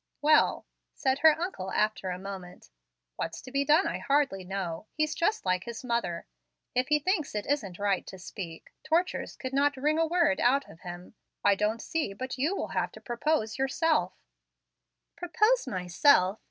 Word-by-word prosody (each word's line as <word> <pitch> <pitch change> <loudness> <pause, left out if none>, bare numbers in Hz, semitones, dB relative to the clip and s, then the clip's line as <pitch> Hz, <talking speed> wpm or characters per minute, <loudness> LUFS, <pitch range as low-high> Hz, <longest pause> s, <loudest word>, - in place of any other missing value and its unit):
"Well," 305 +1 +4 0.3
said 265 0 0
her 315 +1 +6
uncle, 335 - -4
after 215 -3 0
a 180 - -3
moment, 185 - -9 0.5
"what's 165 - -4
to 255 - -10
be 275 +1 +1
done 305 +6 +4
I - - -2
hardly 275 -9 +1
know. 185 -1 -4
He 310 - 0
is 305 +1 -1
just 380 - 0
like 185 0 0
his 235 0 -7
mother. 235 -9 -2 0.5
If 250 +1 +1
he 300 - +4
thinks 310 - -1
it 210 - -2
isn't 210 -11 -1
right 200 -2 0
to 190 - -8
speak, 180 -3 -8
tortures 330 +4 0
could 260 0 -6
not 280 0 +2
wring 300 +4 +1
a 325 - +3
word 330 -4 +2
out 275 +3 +3
of 160 - -14
him. 175 +2 -9 0.3
I 205 - +6
don't 210 +3 -1
see 315 -11 -2
but 260 +5 -6
you 315 +9 +1
will - - -3
have - - -1
to - - -11
propose 240 -1 -1
yourself 310 +4 +1 0.5
" - - -57
"Propose 415 - +2
myself! 185 - +3
255 Hz, 180 wpm, -29 LUFS, 195-305 Hz, 0.5 s, her